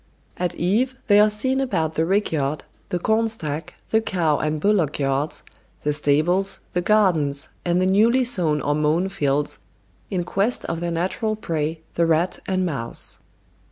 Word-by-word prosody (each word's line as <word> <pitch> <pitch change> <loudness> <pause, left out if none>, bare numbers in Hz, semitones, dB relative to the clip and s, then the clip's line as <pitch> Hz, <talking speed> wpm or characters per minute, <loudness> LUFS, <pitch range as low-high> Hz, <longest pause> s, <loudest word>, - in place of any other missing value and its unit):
At 180 -1 -2
eve 225 +9 +1
they 205 -1 +5
are 210 +1 +6
seen 260 +6 0
about 165 - -1
the 160 +1 0
rick 200 +3 +1
yard, 150 -1 -1 0.3
the 180 - 0
corn 220 +5 +1
stack, 160 -8 -5 0.2
the 220 - +3
cow 170 -8 0
and 155 0 -1
bullock 180 -5 +1
yards, 140 +2 -1 0.4
the 150 - 0
stables, 155 +7 +1
the 180 - +1
gardens, 175 -9 +2
and 175 0 +1
the 185 - +2
newly 225 +7 +4
sown 170 - +2
or 145 - 0
mown 155 +5 +1
fields, 145 -6 -1 0.5
in 180 -3 -1
quest 200 +7 0
of 165 - -3
their 175 0 -2
natural 185 +6 -1
prey, 160 -5 -3
the 170 0 +2
rat 165 +3 +1
and 185 -1 0
mouse. 135 -9 -2
175 Hz, 165 wpm, -22 LUFS, 155-205 Hz, 0.5 s, are